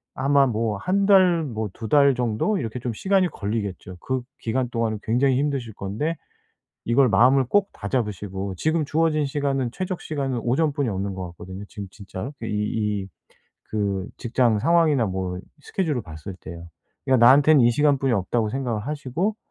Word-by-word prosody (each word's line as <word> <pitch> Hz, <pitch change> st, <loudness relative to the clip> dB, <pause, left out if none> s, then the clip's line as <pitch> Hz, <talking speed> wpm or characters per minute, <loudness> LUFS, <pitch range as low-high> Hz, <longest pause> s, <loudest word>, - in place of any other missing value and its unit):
아마 140 Hz, +1 st, +3 dB
뭐 110 Hz, -2 st, -1 dB
1 195 Hz, -, 0 dB
달 185 Hz, -4 st, +5 dB
뭐 110 Hz, -7 st, -4 dB
2 110 Hz, -, -6 dB
달 140 Hz, 0 st, +5 dB
정도 125 Hz, -, 0 dB
이렇게 115 Hz, -1 st, -4 dB
좀 120 Hz, 0 st, -3 dB
시간이 190 Hz, -, +2 dB
걸리겠죠. 100 Hz, -, -4 dB
그 130 Hz, -1 st, -2 dB, 0.2 s
기간 125 Hz, +2 st, -1 dB
동안은 115 Hz, -2 st, -1 dB
굉장히 125 Hz, +3 st, +2 dB
힘드실 135 Hz, -6 st, -2 dB
건데 110 Hz, +14 st, -3 dB, 0.7 s
이걸 125 Hz, +2 st, +4 dB
마음을 130 Hz, +4 st, +5 dB
꼭 205 Hz, +6 st, +2 dB
다잡으시고 100 Hz, -3 st, -3 dB
지금 155 Hz, -, 0 dB
주어진 155 Hz, 0 st, +1 dB
시간은 135 Hz, -3 st, -1 dB
최적 185 Hz, +1 st, -4 dB
시간은 135 Hz, -5 st, -2 dB
오전뿐이 140 Hz, +2 st, +1 dB
없는 100 Hz, -1 st, -3 dB
것 95 Hz, -1 st, -5 dB
같거든요 95 Hz, +3 st, -9 dB
지금 100 Hz, -3 st, -7 dB
진짜로. 100 Hz, +5 st, -7 dB
그 115 Hz, -, -6 dB
이 -, -, -4 dB, 0.6 s
이 -, -, -12 dB, 0.6 s
그 100 Hz, -2 st, -1 dB
직장 120 Hz, -3 st, +1 dB
상황이나 160 Hz, -4 st, +3 dB
뭐 95 Hz, -1 st, -3 dB, 0.2 s
스케줄을 155 Hz, -9 st, -2 dB
봤을 80 Hz, +4 st, -9 dB
때요. 85 Hz, 0 st, -9 dB, 0.4 s
그니까 130 Hz, -1 st, +4 dB
'나한텐 145 Hz, +3 st, +7 dB
이 120 Hz, 0 st, +5 dB
시간뿐이 140 Hz, -1 st, +2 dB
없다.'고 110 Hz, +2 st, 0 dB
생각을 125 Hz, -4 st, -2 dB
하시고 155 Hz, -, -2 dB
125 Hz, 345 characters per minute, -24 LUFS, 105-145 Hz, 0.7 s, 나한텐